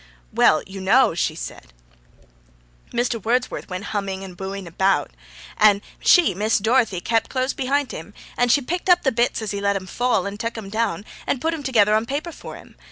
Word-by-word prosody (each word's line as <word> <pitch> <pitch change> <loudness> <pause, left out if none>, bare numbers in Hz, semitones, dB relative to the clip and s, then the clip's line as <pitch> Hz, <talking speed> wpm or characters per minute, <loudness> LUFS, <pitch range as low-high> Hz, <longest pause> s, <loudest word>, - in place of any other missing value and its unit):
'Well, 155 - +4
you 195 0 -8
know,' 230 +4 +4
she 160 -1 -1
said, - - -8 1.2
'Mr. 240 -3 -1
Wordsworth 245 0 -1
went 185 +1 -5
humming 195 -2 -3
and 185 -2 -9
booing 195 +1 -6
about, 190 +3 +1 0.5
and 205 -2 +5 0.2
she, 350 - +5
Miss 210 +4 +1
Dorothy, 220 -3 +1
kept 225 +2 0
close 260 0 -1
behint 275 +1 -1
him, 185 +6 -9 0.2
and 245 -1 +2
she 285 - +4
picked 355 +7 -3
up 355 0 +5
the 265 - +2
bits 235 -1 0
as 215 - -3
he 200 -1 -4
let 200 0 +1
'em 190 -1 -4
fall, 245 -1 0
and 200 +1 -5
tak' 230 +1 -3
'em 200 -3 -7
down, 215 -3 -1 0.2
and 265 - 0
put 325 +5 -1
'em 320 - -5
together 220 -6 +3
on 220 +2 +1
paper 290 +6 -3
for - - -10
him. - - -15
220 Hz, 200 wpm, -22 LUFS, 195-255 Hz, 1.2 s, and